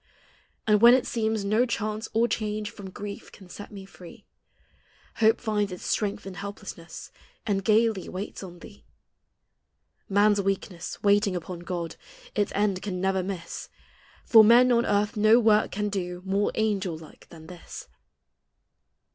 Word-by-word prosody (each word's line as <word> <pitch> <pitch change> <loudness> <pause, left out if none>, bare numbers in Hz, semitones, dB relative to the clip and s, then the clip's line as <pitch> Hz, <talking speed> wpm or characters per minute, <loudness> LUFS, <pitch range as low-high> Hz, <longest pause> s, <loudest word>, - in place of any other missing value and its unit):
And 210 -1 +3
when 240 +1 +9
it 260 - 0
seems 220 -3 -1
no 215 +4 +3
chance 215 -2 -3
or 230 +2 +2
change 215 -1 -3
From 200 -4 -10
grief 200 +2 -8
can 190 -3 -15
set 205 +4 -10
me 195 -2 -9
free, 180 -2 -14 0.9
Hope 220 +1 +4
finds 210 -3 -1
its 180 - -8
strength 205 -1 -1
in 195 - -7
helplessness, 200 -3 -9 0.3
And 195 -3 0
gayiy 220 -1 +2
waits 190 +3 -6
on 180 -2 -9
thee. 65 -1 -14 1.3
Man's 205 +1 +3
weakness, 190 -2 -4
waiting 205 -1 +3
upon 175 0 -6
God, 175 -2 -5 0.4
Its 205 -1 0
end 200 -2 0
can 185 -3 -4
never 190 0 +1
miss. 185 -2 -6 0.6
For 225 -2 +8
men 240 +3 +6
on 235 -1 +2
earth 205 +1 +1
no 215 +3 +5
work 215 -2 +3
can 210 +1 -2
do 180 -3 -4
More 195 +2 0
angel 200 -6 -1
like 155 -1 -15
than 160 -2 -13
this. 175 +1 -10
205 Hz, 150 wpm, -26 LUFS, 185-215 Hz, 1.3 s, when